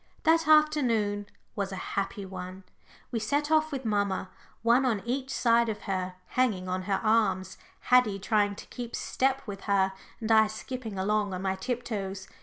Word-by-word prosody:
That 325 0 +4
afternoon 245 -10 +3 0.3
was 200 -2 -2
such 190 - -6
a - - -5
happy 200 +1 -3
one. 185 0 -8 0.5
We 230 - -1
set 285 +7 0
off 310 0 +3
with 270 -3 -4
mamma, 200 -3 0 0.3
one 235 +3 +4
on 225 -7 0
each 260 +2 -2
side 235 -2 +3
of 210 - -4
her, 185 -1 -3
hanging 215 -8 +1
on 185 0 -1
her 195 - +2
arms, 215 -4 +1 0.2
Haddie 250 -5 +4
trying 205 0 +1
to - - -10
keep 240 -2 -6
step 265 +1 0
with 195 -2 -7
her, 190 -1 +2 0.3
and 225 -1 -2
I 220 -1 +6
skipping 220 -1 -6
along 205 0 0
on 185 - -5
my 190 -1 +1
tiptoes. 200 -3 -4
215 Hz, 175 wpm, -28 LUFS, 195-250 Hz, 0.5 s, I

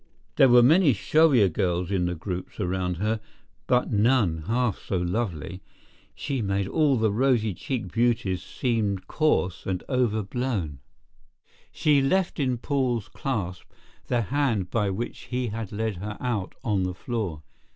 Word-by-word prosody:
There 135 - +7
were 120 0 +7
many 155 +2 +5
showier 135 0 +4
girls 90 0 -1
in 90 -3 +1
the 90 - -2
groups 90 +4 -6
around 90 -2 -1
her, 110 +4 0 0.5
but 125 0 +2
none 105 -8 +2
half 120 -3 0
so 95 - -2
lovely. 90 - -3 0.5
She 135 -3 -3
made 100 -1 -1
all 145 +1 +2
the 110 -2 +2
rosy 115 -2 +2
cheeked 105 0 -4
beauties 115 -6 +1
seem 110 -6 -1
coarse 95 - 0
and 95 -2 -2
over 120 -5 +1
blown. 100 - -3 0.9
She 145 -2 +3
left 180 +6 +1
in 130 -3 +1
Paul's 120 -4 -1
clasp 95 -9 -3 0.4
the 120 -2 +1
hand 115 -7 0
by 105 -4 +1
which 110 +5 -5
he 125 -1 -2
had 110 -1 -5
led 110 -2 -2
her 105 +3 -6
out 115 -7 -2
on 105 -6 +1
the 90 -1 -2
floor. 100 - -4
110 Hz, 150 wpm, -26 LUFS, 95-125 Hz, 0.9 s, There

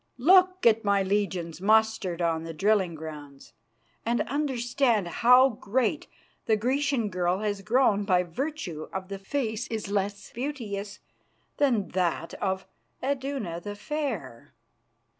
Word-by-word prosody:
Look 370 +6 +5
at 225 0 +5
my 200 -1 +2
legions 190 -4 -1
mustered 215 -4 +2
on 165 -1 0
the 165 -1 -7
drilling 195 -2 +2
grounds, 150 -3 -10 0.5
and 235 +1 +1
understand 245 -6 0
how 250 +9 +5
great 240 +5 -1 0.4
the 220 -1 +3
Grecian 260 0 0
girl 180 +1 0
has 205 -2 -2
grown 215 -2 +3
by 180 -3 +3
virtue 180 - -5
of 190 0 -5
the 195 -1 -5
face 225 +1 -2
which 225 - -1
is 200 -2 -7
less 200 0 -2
beauteous 215 -7 -5 0.6
than 245 -9 +2
that 175 -2 -1
of 190 -1 -1 0.4
Iduna 265 -10 -2
the 205 +2 -6
Fair!" 215 - -5
210 Hz, 130 wpm, -27 LUFS, 185-250 Hz, 0.6 s, Look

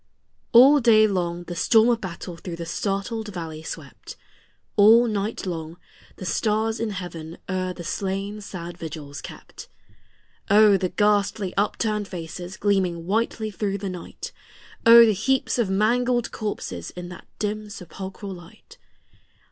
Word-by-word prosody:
ALL 270 +5 +8
day 220 -3 +6
long 175 -4 -1
the 175 0 -7
storm 220 +6 +4
of 235 -1 +1
battle 180 -1 -6
through 170 +1 -7
the 170 0 -6
startled 200 +5 -3
valley 165 -5 -6
swept; 160 - -9 0.6
All 225 +3 +7
night 210 -2 -2
long 165 -2 -5 0.4
the 185 - -8
stars 220 +5 0
in 230 - -1
heaven 170 -4 -7
o'er 185 -1 -2
the 180 -1 -8
slain 195 +4 -3
sad 175 -3 -8
vigils 150 -3 -7
kept. - - -11 0.8
O, 210 0 +7
the 185 -1 0
ghastly 205 -2 +1
upturned 210 +1 0
faces 175 +1 -7
gleaming 185 -5 0
whitely 220 +2 -1
through 200 +1 -2
the 200 -1 -4
night! 180 -2 -8 0.6
O, 235 0 +10
the 220 - +3
heaps 255 +5 0
of 225 -5 +1
mangled 240 +4 +1
corses 205 - -5
in 175 0 -8
that 180 - -11
dim 210 0 -3
sepulchral 195 +1 -8
light! 175 -1 -15
195 Hz, 140 wpm, -24 LUFS, 175-215 Hz, 0.8 s, O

